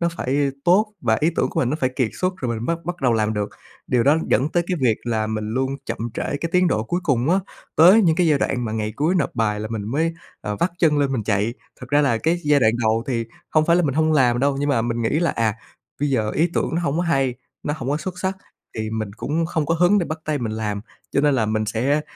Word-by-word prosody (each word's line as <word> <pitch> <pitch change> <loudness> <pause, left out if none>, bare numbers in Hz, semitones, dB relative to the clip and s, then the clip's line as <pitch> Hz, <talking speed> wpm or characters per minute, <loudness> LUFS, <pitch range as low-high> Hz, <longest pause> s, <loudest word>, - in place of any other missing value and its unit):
nó 170 - +2
phải 140 +2 0
tốt, 210 +5 +3
và 110 -3 +2
ý 160 +3 +3
tưởng - - +2
của - - -1
mình 125 - +1
nó 150 - 0
phải 130 -1 +1
kiệt 125 -5 +2
xuất 185 +1 +1
rồi 120 -8 -2
mình 115 +2 -5
bắt 170 0 0
bắt 175 +1 -3
đầu 125 -3 +3
làm 110 -1 +1
được. 105 0 -1 0.4
Điều 125 -2 +2
đó 145 +5 +4
dẫn 130 +7 +3
tới 170 +1 +1
cái 180 -1 -1
việc 115 -4 +3
là 110 -2 0
mình 110 -1 -3
luôn 130 +3 -1
chậm - - -3 0.2
trễ - - -3
cái 145 +4 -2
tiến 180 0 +4
độ 110 -7 0
cuối 175 +9 -2
cùng 140 -2 +1
á, 185 - +4 0.4
tới 185 +8 +7
những 165 -4 +3
cái 180 -1 +3
giai 150 -3 +3
đoạn 125 -2 -1
mà 110 - -3
ngày 110 -1 -2
cuối 155 +5 +1
nộp 170 -6 +1
bài 105 -3 0
là 110 - -4
mình 110 -2 -3
mới, 160 +5 0 0.3
ờ, 105 0 -4
vắt 170 - +1
chân 155 -4 +3
lên 140 -2 +1
mình 115 -5 -1
chạy. 105 +2 0 0.3
Thật - - -8
ra 145 +1 +4
là 120 -6 +2
cái 165 +6 +1
giai 145 -1 +4
đoạn 110 -2 +4
đầu 110 +2 +1
thì 115 -3 -1 0.3
hông 155 0 +3
phải 170 0 +4
là 180 - +3
mình 140 -4 0
hông 155 0 +2
làm 125 -5 +3
đâu, 140 +1 +1
nhưng 145 - 0
mà 115 -5 +2
mình 120 0 -2
nghĩ 115 +7 +1
là, 170 -3 +2
à, 110 -2 0 0.5
bây 145 - +1
giờ 110 -5 +1
ý 165 +7 +1
tưởng - - 0
nó 170 - +1
hông 150 -3 -1
có 175 - +1
hay, 135 -7 +1 0.3
nó 150 - -2
hổng 135 -3 -4
có 145 - +1
xuất 180 +3 -5
sắc 190 0 -2 0.4
thì 110 0 -2
mình 110 -2 -3
cũng 160 +6 -1
không 160 -2 -1
có 165 - +1
hứng 180 +5 +4
để 175 - -1
bắt 155 0 -4
tay 155 -1 -1
mình 115 -4 -3
làm. 105 -2 -3 0.3
Cho - - +3
nên 145 -1 +3
là 115 -4 +1
mình 110 0 -1
sẽ, 130 +8 +1
140 Hz, 285 wpm, -22 LUFS, 115-165 Hz, 0.5 s, tới